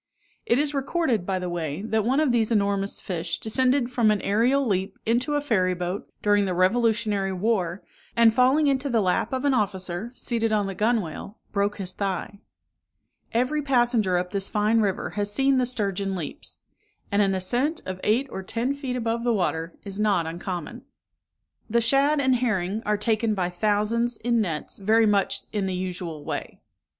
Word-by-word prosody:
It 235 Hz, -, +3 dB
is 290 Hz, +1 st, 0 dB
recorded, 275 Hz, -, 0 dB
by 190 Hz, -1 st, 0 dB
the 180 Hz, 0 st, -3 dB
way, 170 Hz, 0 st, -3 dB
that 220 Hz, -1 st, 0 dB
one 260 Hz, +6 st, +2 dB
of 305 Hz, -4 st, +3 dB
these 230 Hz, -2 st, +2 dB
enormous 200 Hz, -2 st, +1 dB
fish 170 Hz, -2 st, -3 dB
descended 255 Hz, +2 st, +1 dB
from 235 Hz, -3 st, +3 dB
an 210 Hz, -1 st, +2 dB
aerial 245 Hz, +7 st, +2 dB
leap 195 Hz, -3 st, -1 dB
into 250 Hz, +6 st, +1 dB
a 290 Hz, -, +1 dB
ferry 185 Hz, -10 st, +1 dB
boat, 180 Hz, +2 st, -4 dB
during 205 Hz, -1 st, +3 dB
the 185 Hz, -2 st, -1 dB
revolutionary 210 Hz, 0 st, +2 dB
war, 190 Hz, -2 st, -1 dB, 0.3 s
and 230 Hz, -1 st, +5 dB
falling 260 Hz, +5 st, +4 dB
into 275 Hz, 0 st, +1 dB
the 235 Hz, -3 st, +2 dB
lap 190 Hz, +3 st, +1 dB
of 260 Hz, +1 st, -2 dB
an 280 Hz, -, +3 dB
officer, 195 Hz, -1 st, -2 dB
seated 230 Hz, -3 st, -1 dB
on 210 Hz, -2 st, +2 dB
the 195 Hz, -, -3 dB
gunwale, 210 Hz, -2 st, -1 dB
broke 200 Hz, 0 st, 0 dB
his 185 Hz, -3 st, -4 dB
thigh. 200 Hz, +1 st, -3 dB, 0.9 s
Every 255 Hz, +6 st, +1 dB
passenger 240 Hz, -8 st, +2 dB
up 180 Hz, 0 st, -2 dB
this 195 Hz, -1 st, -2 dB
fine 215 Hz, +1 st, +2 dB
river 200 Hz, -3 st, -1 dB
has 205 Hz, 0 st, -2 dB
seen 270 Hz, +4 st, +3 dB
the 250 Hz, -, +1 dB
sturgeon 200 Hz, -5 st, -1 dB
leaps; 165 Hz, -5 st, -6 dB, 0.5 s
and 200 Hz, +1 st, +3 dB
an 195 Hz, -1 st, +2 dB
ascent 245 Hz, -, -1 dB
of 185 Hz, 0 st, -5 dB
eight 235 Hz, +6 st, +2 dB
or 190 Hz, -, -5 dB
ten 230 Hz, +7 st, -2 dB
feet 275 Hz, -3 st, -4 dB
above 230 Hz, -1 st, -1 dB
the 240 Hz, -, +2 dB
water 165 Hz, -3 st, -1 dB
is 200 Hz, 0 st, -6 dB
not 200 Hz, -6 st, +2 dB
uncommon. 175 Hz, +6 st, -5 dB, 0.9 s
The 235 Hz, +2 st, +3 dB
shad 275 Hz, +6 st, +3 dB
and 260 Hz, -2 st, +3 dB
herring 215 Hz, -4 st, -1 dB
are 210 Hz, 0 st, +2 dB
taken 215 Hz, +1 st, +1 dB
by 180 Hz, -2 st, -1 dB
thousands, 215 Hz, +5 st, +1 dB
in 235 Hz, 0 st, +1 dB
nets, 165 Hz, -4 st, -3 dB
very 220 Hz, +3 st, +4 dB
much 200 Hz, -1 st, +1 dB
in 200 Hz, -2 st, -1 dB
the 185 Hz, -, -2 dB
usual 175 Hz, -4 st, -5 dB
way. -, -, -5 dB
210 Hz, 180 wpm, -25 LUFS, 190-240 Hz, 0.9 s, and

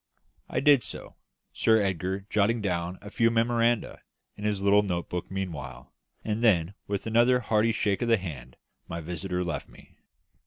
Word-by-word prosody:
I -, -, -1 dB
did 140 Hz, -3 st, +5 dB
so, -, -, -7 dB, 0.4 s
Sir 110 Hz, -1 st, +4 dB
Edgar 95 Hz, -1 st, -1 dB
jotting 105 Hz, +3 st, +1 dB
down 90 Hz, -3 st, -2 dB
a 105 Hz, -, -9 dB
few 115 Hz, +1 st, +3 dB
memoranda 115 Hz, 0 st, +1 dB, 0.3 s
in 105 Hz, -, -7 dB
his 105 Hz, -2 st, 0 dB
note 100 Hz, -3 st, +2 dB
book 90 Hz, -1 st, -4 dB
meanwhile; 70 Hz, -10 st, -6 dB, 0.3 s
and 110 Hz, +1 st, -2 dB
then, 90 Hz, -5 st, +3 dB
with 100 Hz, -1 st, -3 dB
another 120 Hz, +3 st, +4 dB
hearty 110 Hz, 0 st, +2 dB
shake 105 Hz, -3 st, 0 dB
of 120 Hz, -, 0 dB
the 115 Hz, -1 st, +4 dB
hand, 80 Hz, -10 st, -8 dB, 0.3 s
my 85 Hz, -, -5 dB
visitor 90 Hz, +2 st, -3 dB
left 85 Hz, -3 st, -4 dB
me. -, -, -19 dB
100 Hz, 160 wpm, -27 LUFS, 90-115 Hz, 0.4 s, did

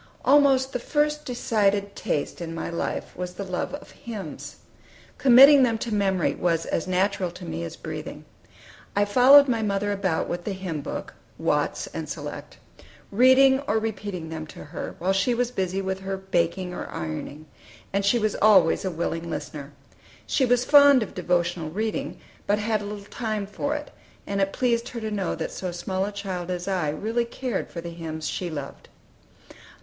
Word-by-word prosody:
ALMOST 270 Hz, -2 st, +4 dB
the 250 Hz, -, -1 dB
first 300 Hz, +3 st, 0 dB
decided 205 Hz, -5 st, 0 dB
taste 145 Hz, -, -2 dB
in 165 Hz, -1 st, -5 dB
my 165 Hz, -, -4 dB
life 170 Hz, -, -3 dB
was 180 Hz, 0 st, -5 dB
the 200 Hz, -, -4 dB
love 185 Hz, +8 st, -3 dB
of 290 Hz, -, -12 dB
hymns. 220 Hz, -4 st, -8 dB, 0.6 s
Committing 275 Hz, +2 st, +8 dB
them 235 Hz, -3 st, +3 dB
to 225 Hz, 0 st, -4 dB
memory 195 Hz, -3 st, +1 dB
was 165 Hz, -2 st, 0 dB
as 165 Hz, -, -2 dB
natural 185 Hz, 0 st, +1 dB
to 175 Hz, -, -10 dB
me 80 Hz, +1 st, -4 dB
as 85 Hz, -, -6 dB
breathing. -, -, -7 dB, 0.7 s
I 205 Hz, 0 st, +3 dB
followed 260 Hz, +7 st, +7 dB
my 230 Hz, -3 st, +1 dB
mother 205 Hz, -1 st, 0 dB
about 190 Hz, -5 st, -1 dB
with 175 Hz, 0 st, -4 dB
the 205 Hz, -, -3 dB
hymn 185 Hz, -5 st, -4 dB
book -, -, -6 dB, 0.2 s
("Watts' -, -, 0 dB
and -, -, -5 dB
Select"), -, -, -7 dB, 0.5 s
reading 260 Hz, +4 st, +6 dB
or 215 Hz, -, +2 dB
repeating 205 Hz, -6 st, -4 dB
them 160 Hz, -1 st, -6 dB
to -, -, -10 dB
her, 150 Hz, +3 st, -7 dB
while 190 Hz, +2 st, 0 dB
she 200 Hz, +6 st, +1 dB
was 245 Hz, 0 st, 0 dB
busy 190 Hz, -3 st, -2 dB
with 190 Hz, 0 st, -2 dB
her 195 Hz, 0 st, -4 dB
baking 180 Hz, -1 st, -1 dB
or -, -, -6 dB
ironing, 80 Hz, -, -6 dB, 0.5 s
and 200 Hz, 0 st, +1 dB
she 200 Hz, +5 st, +3 dB
was 215 Hz, -2 st, 0 dB
always 195 Hz, -6 st, +5 dB
a 190 Hz, -, -1 dB
willing 170 Hz, 0 st, -3 dB
listener. 145 Hz, -3 st, -6 dB, 0.5 s
She 265 Hz, -, +2 dB
was 245 Hz, 0 st, +2 dB
fond 285 Hz, -3 st, +7 dB
of -, -, -9 dB
devotional 175 Hz, -2 st, 0 dB
reading, 215 Hz, +6 st, -3 dB, 0.3 s
but 205 Hz, -, +3 dB
had 215 Hz, 0 st, 0 dB
little 205 Hz, 0 st, -7 dB
time 215 Hz, -1 st, -3 dB
for 285 Hz, +9 st, -3 dB
it, 295 Hz, -1 st, -6 dB, 0.3 s
and 200 Hz, 0 st, -1 dB
it 195 Hz, 0 st, +1 dB
pleased 235 Hz, -1 st, 0 dB
her 235 Hz, -, -6 dB
to 220 Hz, -1 st, -4 dB
know 195 Hz, -4 st, -1 dB
that 160 Hz, -, -4 dB
so 185 Hz, -1 st, -4 dB
small 185 Hz, +2 st, -2 dB
a 205 Hz, -, -4 dB
child 190 Hz, -3 st, -5 dB
as 180 Hz, 0 st, -3 dB
I 180 Hz, -6 st, 0 dB
really 220 Hz, +10 st, -1 dB
cared 235 Hz, -2 st, -4 dB
for 170 Hz, -, -6 dB
the 170 Hz, 0 st, -7 dB
hymns 160 Hz, -2 st, -5 dB
she 180 Hz, -, -3 dB
loved. 145 Hz, -4 st, -7 dB
200 Hz, 180 wpm, -25 LUFS, 175-230 Hz, 0.7 s, Committing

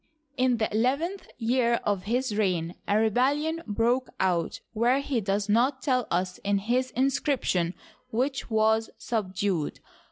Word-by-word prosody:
In 255 Hz, -2 st, +2 dB
the 220 Hz, -, +1 dB
eleventh 280 Hz, -, 0 dB
year 235 Hz, 0 st, +2 dB
of 200 Hz, -3 st, -1 dB
his 240 Hz, 0 st, 0 dB
reign 180 Hz, -5 st, 0 dB
a 205 Hz, -, +3 dB
rebellion 280 Hz, +9 st, +1 dB
broke 235 Hz, +4 st, +1 dB
out, 175 Hz, -3 st, 0 dB
where 240 Hz, +4 st, +3 dB
he 275 Hz, -4 st, -1 dB
does 200 Hz, +1 st, -1 dB
not 255 Hz, +5 st, +2 dB
tell 255 Hz, -3 st, +1 dB
us 180 Hz, +1 st, -1 dB
in 200 Hz, 0 st, +1 dB
his 245 Hz, +6 st, 0 dB
inscription, 260 Hz, -, +1 dB, 0.3 s
which 265 Hz, +4 st, -1 dB
was 220 Hz, 0 st, +2 dB
subdued. 190 Hz, -7 st, -2 dB
225 Hz, 135 wpm, -27 LUFS, 200-255 Hz, 0.3 s, a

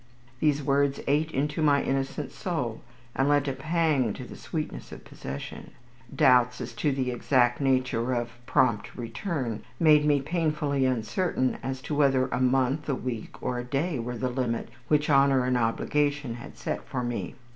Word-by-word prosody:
These 150 Hz, -2 st, +2 dB
words 140 Hz, 0 st, +2 dB
ate 150 Hz, +3 st, +2 dB
into 145 Hz, +2 st, -1 dB
my 145 Hz, -2 st, +4 dB
innocent 135 Hz, +1 st, -2 dB
soul, 140 Hz, -6 st, -3 dB, 0.3 s
and 135 Hz, +2 st, +2 dB
lent 145 Hz, -1 st, +3 dB
a 135 Hz, -, 0 dB
pang 155 Hz, -7 st, +1 dB
to -, -, -7 dB
the -, -, -10 dB
sweetness -, -, -5 dB
of -, -, -10 dB
possession. 70 Hz, +1 st, -8 dB, 0.4 s
Doubts 125 Hz, -4 st, +4 dB
as -, -, -6 dB
to 150 Hz, -, +1 dB
the 130 Hz, -2 st, -1 dB
exact 120 Hz, 0 st, +2 dB
nature 130 Hz, -2 st, +1 dB
of 120 Hz, 0 st, -2 dB, 0.2 s
"prompt 130 Hz, -7 st, +1 dB
return" 120 Hz, -, -3 dB, 0.2 s
made 155 Hz, -2 st, +6 dB
me 145 Hz, -1 st, +3 dB
painfully 150 Hz, -2 st, 0 dB
uncertain 130 Hz, -, 0 dB
as 130 Hz, 0 st, -4 dB
to -, -, -4 dB
whether 135 Hz, -3 st, +3 dB
a -, -, -1 dB
month, 130 Hz, +3 st, +1 dB
a 140 Hz, -, +2 dB
week, 125 Hz, -3 st, -5 dB
or 125 Hz, -1 st, -1 dB
a -, -, -3 dB
day 140 Hz, +4 st, -1 dB
were 120 Hz, +1 st, -4 dB
the 130 Hz, -, -1 dB
limit 125 Hz, -2 st, -2 dB, 0.2 s
which 150 Hz, 0 st, +2 dB
Honour 135 Hz, -3 st, +4 dB
and 125 Hz, 0 st, +1 dB
Obligation 140 Hz, +3 st, 0 dB
had 120 Hz, -, -10 dB
set -, -, -3 dB
for 125 Hz, -2 st, -3 dB
me. 120 Hz, -1 st, -3 dB
135 Hz, 170 wpm, -27 LUFS, 125-145 Hz, 0.4 s, made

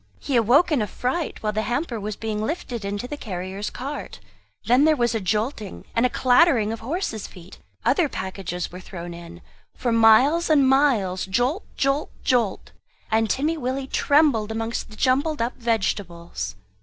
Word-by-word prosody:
He 275 Hz, -, -2 dB
awoke 250 Hz, +10 st, +4 dB
in 285 Hz, -6 st, +2 dB
a 210 Hz, -, -1 dB
fright, 260 Hz, -, -3 dB
while 210 Hz, 0 st, 0 dB
the 215 Hz, -, 0 dB
hamper 240 Hz, +3 st, -2 dB
was 210 Hz, 0 st, -4 dB
being 215 Hz, -1 st, -3 dB
lifted 245 Hz, -, -4 dB
into 205 Hz, +4 st, -3 dB
the 295 Hz, -, -6 dB
carrier's 190 Hz, -2 st, -5 dB
cart. 280 Hz, +3 st, -6 dB, 0.5 s
Then 250 Hz, +6 st, +4 dB
there 310 Hz, 0 st, +5 dB
was 240 Hz, -3 st, +1 dB
a 225 Hz, -, 0 dB
jolting, 210 Hz, +2 st, -2 dB
and 230 Hz, +2 st, +4 dB
a -, -, -7 dB
clattering 245 Hz, -3 st, +4 dB
of 225 Hz, -, -6 dB
horse's 250 Hz, -, -3 dB
feet; 180 Hz, 0 st, -14 dB, 0.3 s
other 340 Hz, -6 st, +3 dB
packages 185 Hz, -3 st, -5 dB
were 180 Hz, -, -8 dB
thrown 175 Hz, -2 st, -8 dB
in; 170 Hz, 0 st, -11 dB, 0.3 s
for 240 Hz, -, -1 dB
miles 230 Hz, +10 st, +5 dB
and 285 Hz, -4 st, +5 dB
miles 240 Hz, -10 st, +2 dB
jolt 245 Hz, -, 0 dB
jolt 275 Hz, +2 st, +1 dB
jolt! 235 Hz, -7 st, 0 dB, 0.4 s
and 220 Hz, 0 st, +2 dB
Timmy 305 Hz, +8 st, 0 dB
Willie 265 Hz, -1 st, -2 dB
trembled 275 Hz, -6 st, +2 dB
amongst 225 Hz, +1 st, -3 dB
the 215 Hz, -, -12 dB
jumbled 280 Hz, +6 st, +1 dB
up 235 Hz, +2 st, -1 dB
vegetables. 190 Hz, -, -2 dB
230 Hz, 170 wpm, -23 LUFS, 205-275 Hz, 0.5 s, there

